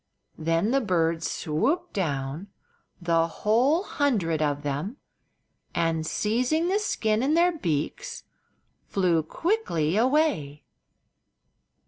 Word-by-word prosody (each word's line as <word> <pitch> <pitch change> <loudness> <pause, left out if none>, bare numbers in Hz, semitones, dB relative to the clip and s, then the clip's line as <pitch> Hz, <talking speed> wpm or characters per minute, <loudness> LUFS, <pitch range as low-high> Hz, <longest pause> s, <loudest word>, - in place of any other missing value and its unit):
Then 165 +6 +1
the 275 +1 +3
birds 165 -6 0
swooped 290 - -1
down—the 165 +1 -3
whole 245 - +2
hundred 205 - 0
of 145 -1 0
them—and 160 - -5
seizing 255 - +1
the 400 +2 +2
skin 220 - 0
in 285 +4 +2
their 350 +2 +4
beaks 160 - -3 0.6
flew 180 -4 +2
quickly 175 - 0
away. 240 - +1
190 Hz, 90 wpm, -26 LUFS, -, 0.6 s, their